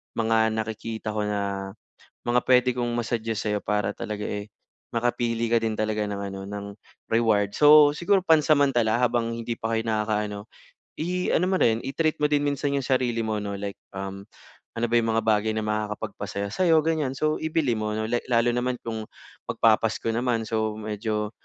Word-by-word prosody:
mga 110 -1 +2
nakikita 110 0 -4
ko 105 - 0
na 100 -1 -2 0.5
mga 120 +1 +2
puwede 125 0 +4
kong 120 -1 -1
ma-suggest 115 -2 -2
sa'yo 105 0 0
para 105 -1 0
talaga, 105 -1 -5
eh, 105 0 -4 0.5
makapili 115 -1 0
ka 115 - +4
din 115 -1 0
talaga 110 0 -1
ng 100 -1 -4
ano, 95 0 -7
ng 100 0 -6 0.5
reward. 110 -3 +3
So, 150 0 +7
siguro 195 +3 +3
pansamantala, 140 -9 +3
habang 120 -1 +1
hindi 115 0 -4
pa 115 - -3
kayo 110 - +1
nakakaano, 105 -1 -1 0.5
i-ano 180 +1 0
mo 190 +1 +1
rin, 110 -1 +4
i-treat 155 +3 0
mo - - +5
din 145 -1 +3
minsan 145 0 0
'yong 140 - -1
sarili 125 -3 +1
mo 110 -1 -1
'no, 100 -1 -4
like, 100 0 -4 0.2
um, 95 0 -6 0.5
ano 115 0 -1
ba 120 - +1
yung 115 -1 +1
mga 115 - +2
bagay 110 0 +2
na 110 - -1
makakapagpasaya 105 -1 -3
sa'yo, 160 - +3
ganyan. 155 -4 0
So, 155 +3 0
ibili 155 -7 0
mo 105 0 -2
'no, 110 0 -2
like 120 0 -1
lalo 120 -1 +2
naman 125 +1 -1
kung 110 -1 -5 0.4
magpaPasko 115 0 +2
naman. 115 -1 -1
So, 110 -1 0
medyo 105 0 -2
115 Hz, 175 wpm, -25 LUFS, 105-125 Hz, 0.5 s, So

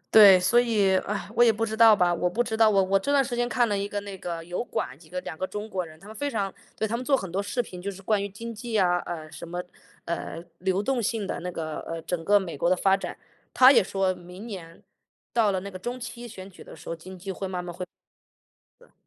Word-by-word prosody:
对， 200 -4 +9
所 190 +6 +4
以， 210 -5 +2
唉， 205 +1 -4
我 240 +1 +6
也 230 - +6
不 225 +2 -1
知 220 0 -4
道 225 -1 +8
吧 180 -3 +3
我 180 +1 0
不 230 +7 +1
知 225 -2 -3
道。 220 -1 +6
我 195 -2 +4
我 195 +1 +3
这 280 +9 -1
段 280 -1 +5
时 245 -2 -3
间 240 0 +1
看 240 -1 +2
了 205 - 0
一 200 0 -1
个 205 0 -3
那 200 -1 -7
个 170 -2 -5
油 175 +6 -3
管， 135 - -4
几 160 -1 -18
个， 180 0 -3
2， 180 -3 -6
个 185 - -2
中 210 +2 -6
国 185 -4 -2
人， 160 -1 -13
他 195 - -15
们 215 - -10
非 285 +3 -2
常 200 -6 -2 0.2
对， 220 - 0
他 230 - -1
们 250 - -5
做 280 - +3
很 195 -8 -5
多 190 +3 -1
视 205 +5 -2
频， 180 -5 -10
就 200 - -2
是 195 -1 -10
关 205 0 +1
于 - - -1
经 230 +4 -7
济 225 0 -2
啊 180 -2 +3
呃， 160 -3 -6
什 160 - -9
么， 175 +1 -4 0.4
呃， 170 0 -4 0.2
流 190 +2 0
动 255 +1 0
性 215 -1 -1
的 - - -3
那 180 - -4
个， 160 -3 -4
呃， 165 0 -5
整 170 -1 -3
个 205 +3 +5
美 175 -5 -5
国 170 +5 +1
的 185 - +4
发 195 +1 +4
展。 195 - -6 0.3
他 255 +1 +8
也 - - +6
说 190 -1 0
明 180 +4 -11
年， 175 -7 -9 0.5
到 225 -3 +4
了 190 - -1
那 200 +2 -7
个 185 - -8
中 240 +6 -4
期 240 0 -7
选 190 -4 -9
举 185 - -14
的 - - -11
时 - - -12
候， 165 - -3
经 185 +3 -11
济 195 +2 -6
会 195 +1 -5
慢 185 -1 -3
慢 175 -1 -7
会 180 - -5 1.0
呃。 - - -22
195 Hz, 295 characters per minute, -26 LUFS, 180-225 Hz, 1.0 s, 对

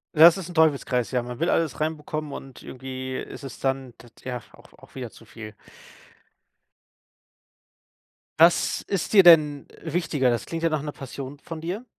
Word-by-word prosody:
Ja, 155 - +2
das 170 +1 +9
ist 185 -2 -7
'n 175 - -10
Teufelskreis, 140 -6 +2
ja. 125 -1 +1
Man 120 +1 -8
will 170 +2 +1
alles 165 -3 0
reinbekommen 155 -1 -3
und 135 -2 -10
irgendwie 130 0 -6
ist 140 - -7
es 135 -3 -8
dann 135 -3 -2
t 120 - -15
tja, 125 -2 -6
auch - - -19
auch - - -19
wieder 125 -4 -6
zu - - -16
viel. 110 -1 -10 2.9
Was 170 +1 +4
ist 195 -4 -2
dir 205 - +8
denn 150 -5 +6
wichtiger? 160 -5 0
Das 120 -1 -1
klingt 165 0 -5
ja 165 - +3
nach 155 -2 -1
'ner 150 0 -6
Passion 135 +1 -8
von 165 +1 -8
dir. 180 +9 -5
145 Hz, 175 wpm, -25 LUFS, 130-165 Hz, 2.9 s, das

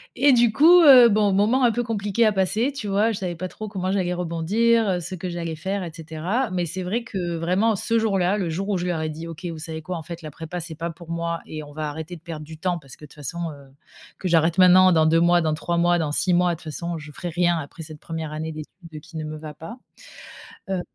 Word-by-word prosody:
et 275 +3 +5
du 235 -3 +4
coup, 345 +4 +7
heu, 255 -5 +9
bon, 205 -2 +2
moment 220 +7 +3
un 240 - +5
peu 240 - -1
compliqué 210 -1 0
à 215 - +4
passer, 210 +7 +1
tu 250 -7 -6
vois? 205 +3 +2
Je 205 - -3
savais 180 -2 -4
pas 185 +2 -4
trop 215 +3 -8
comment 190 -2 -3
j'allais 185 -2 0
rebondir, 195 +7 +1
heu, 180 -2 +1
ce 175 +2 -6
que 185 +1 -6
j'allais 170 -2 -4
faire 190 +4 -3
et 170 - -6
cetera, 165 +9 -3
mais 180 -2 -1
c'est 185 +3 -4
vrai 225 +6 -2
que 180 -6 -4
vraiment 185 +7 +1
ce 230 +4 0
jour-là, 200 -3 +1
le 185 - -1
jour 185 +5 -3
où 200 - +1
je 175 - -3
leur 175 -3 -1
ai 155 - -2
dit: 160 +2 -7
«OK, 165 +2 -9
vous 165 - -7
savez 160 0 -6
quoi? 180 +3 -5
En 160 - -7
fait 170 +1 -8
la 155 - -7
prépa 165 +4 -7
c'est 165 -1 -7
pas 165 +2 -4
pour 165 0 -14
moi 170 0 -2
et 155 -1 -6
on 145 0 -12
va 155 -1 -3
arrêter 160 +3 -7
de 165 - -14
perdre 155 -3 -7
du 160 0 -11
temps 180 -1 -1
parce 135 -4 -13
que 150 - -13
de - - -13
toutes - - -19
façons, 165 +4 -5
heu, 140 -2 -14 0.5
que 185 - -3
j'arrête 165 +1 +2
maintenant, 185 0 +7
dans 160 -2 +4
2 165 +1 +4
mois, 175 +1 +4
dans 155 -1 0
3 170 +2 -2
mois, 175 0 +3
dans 155 -3 -1
6 180 +4 +1
mois, 180 0 +3
de - - -6
toutes - - -16
façons, 170 +1 -4
je 150 0 -10
ferai 175 +4 -6
rien 175 0 +1
après 160 +1 -8
cette 155 -1 -10
1re 160 -2 -6
année 160 +1 -4
d'études 155 +1 -10
qui 165 +1 -11
ne 155 - -4
me 155 0 -6
va 150 -1 -9
pas». 220 +10 -9 0.9
Heu 190 -2 -1
175 Hz, 275 wpm, -23 LUFS, 160-195 Hz, 0.9 s, heu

